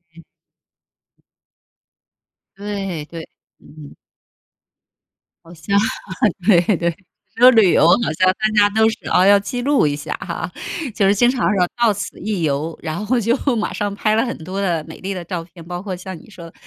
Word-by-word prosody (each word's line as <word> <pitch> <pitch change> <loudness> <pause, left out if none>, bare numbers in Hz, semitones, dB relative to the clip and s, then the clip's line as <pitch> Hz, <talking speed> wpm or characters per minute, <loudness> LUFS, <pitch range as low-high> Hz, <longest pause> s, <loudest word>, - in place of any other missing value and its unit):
嗯。 165 - -14 2.3
对 195 -6 -5
对， 165 +1 -9 0.3
嗯。 150 -2 -14 1.5
好 165 +1 -14
像 200 +5 -1 0.7
对 185 -1 +4
对， 170 -1 -1 0.4
说 250 +2 +7
旅 220 -6 +5
游 - - +4
好 180 -1 +3
像 185 - +4
大 215 - -1
家 205 - +5
都 220 +2 +3
是 220 - -4
啊， 180 - +4
要 200 +1 +6
记 245 +5 -4
录 275 - +2
一 145 - -1
下 145 - -5
哈， - - -5 0.4
就 200 -3 +2
是 200 - +3
经 240 +4 +4
常 255 - -4
说 180 -2 +2
“到 230 - +5
此 200 - -7
一 205 -5 -3
游”， 150 +2 -2
然 165 +4 -4
后 240 +4 +1
就 230 +2 +1 0.2
马 215 - -2
上 205 -1 -2
拍 215 +1 +1
了 225 - +2
很 235 - -4
多 190 +4 -4
的 170 -5 -1
美 160 - -10
丽 195 +1 -4
的 175 - -5
照 175 -1 -4
片， 170 -1 -15
包 175 0 -6
括 195 -2 -5
像 185 0 -8
你 215 - -17
说 170 -4 -11
的， 165 - -13
190 Hz, 195 characters per minute, -19 LUFS, 170-215 Hz, 2.3 s, 说